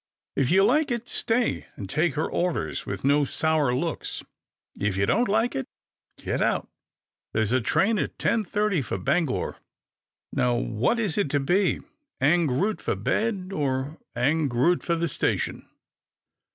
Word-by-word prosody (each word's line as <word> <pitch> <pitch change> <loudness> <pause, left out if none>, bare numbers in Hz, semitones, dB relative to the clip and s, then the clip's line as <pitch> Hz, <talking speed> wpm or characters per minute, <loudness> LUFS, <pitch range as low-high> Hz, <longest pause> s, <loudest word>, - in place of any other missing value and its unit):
If 135 -2 +1
you 190 +3 +5
like 300 +7 +3
it, 240 -1 -2
stay 235 +1 0
and 100 - -6
take 150 - +1
her 155 - 0
orders 175 -1 -2
with - - -4
no 145 +2 +4
sour 155 -1 +1
looks. 165 +4 -3 0.6
If 100 -2 0
you 100 - +3
don't 235 - +2
like 225 +4 +2
it, 135 - -3 0.5
get - - -2
out. - - +1 0.7
There's 110 0 +1
a 130 0 +3
train 210 - +2
at - - -3
ten 230 -1 +1
thirty 205 -3 0
for 115 - -3
Bangor. 135 - 0 0.8
Now 125 -1 +2
which 120 - 0
is 210 -5 0
it 200 - +1
to 145 - +1
be 180 +7 +2 0.2
— 290 - -55
ang 160 +5 +3
root 190 +12 0
for - - -1
bed, 200 -4 -1
or 140 -1 -2 0.2
ang 150 +3 +2
root 130 +9 +2
for 170 - 0
the 170 0 0
station - - -1
160 Hz, 165 wpm, -26 LUFS, 135-205 Hz, 0.8 s, you